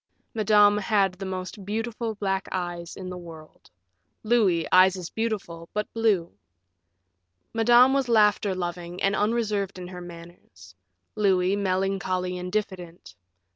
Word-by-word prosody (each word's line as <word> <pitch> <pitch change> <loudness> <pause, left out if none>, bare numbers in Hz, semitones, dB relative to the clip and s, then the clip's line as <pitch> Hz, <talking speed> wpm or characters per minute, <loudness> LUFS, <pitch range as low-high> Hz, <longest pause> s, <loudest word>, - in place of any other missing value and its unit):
Madame 210 -1 +4
had 200 -2 +1
the 190 +1 -7
most 185 +1 -6
beautiful 225 +2 -3
black 195 -1 -2
eyes 175 -2 -4
in 185 - -8
the 180 - -6
world; 160 -3 -13 0.5
Louis, 210 -8 +2
eyes 185 +1 +6
as 180 -2 -7
beautiful, 195 -7 -4
but 210 0 -3
blue. 210 -7 +1 1.2
Madame 240 +3 +5
was 270 -3 0
laughter 210 -3 +3
loving 175 0 -5
and 195 +1 +2
unreserved 210 -3 -1
in 180 -1 -8
her 180 -1 -8
manners; 170 - -13 0.4
Louis, 190 -2 +2
melancholy 190 -1 -1
and 180 0 -6
diffident. 180 - -5
195 Hz, 130 wpm, -25 LUFS, 180-210 Hz, 1.2 s, eyes